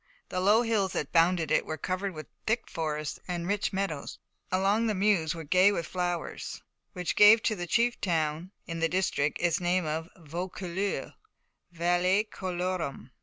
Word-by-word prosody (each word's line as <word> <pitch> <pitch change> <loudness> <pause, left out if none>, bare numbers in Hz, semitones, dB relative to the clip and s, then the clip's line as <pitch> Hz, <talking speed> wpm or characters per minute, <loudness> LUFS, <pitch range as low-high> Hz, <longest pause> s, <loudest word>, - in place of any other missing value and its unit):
The 185 - -2
low 210 +5 +4
hills 215 -5 0
that 145 - -3
bounded 170 -1 +3
it - - +3
were 155 - -5
covered 185 +1 -3
with 155 - -7 0.2
thick 230 +2 0
forests, 155 -2 -3
and 175 -2 -3
the - - -4
rich 205 0 0
meadows 190 -7 -3 0.3
along 200 +5 +2
the 215 - 0
Meuse 185 -5 +2
were 165 - -6
gay 185 +6 +5
with 170 -5 -2
flowers, 175 -1 -4 0.3
which 180 -2 -2
gave 215 +2 +8
to 215 - +1
the 175 -2 -5
chief 240 +5 +1
town 160 0 -1
in 165 -2 -5
the 165 0 +1
district 170 -5 0
its 175 -1 +1
name 180 0 +1
of 160 +2 -3
Vaucouleurs, 180 +3 -4 0.6
Vallis 175 +4 +2
colorum. 180 -7 -3
180 Hz, 170 wpm, -29 LUFS, 165-195 Hz, 0.6 s, gave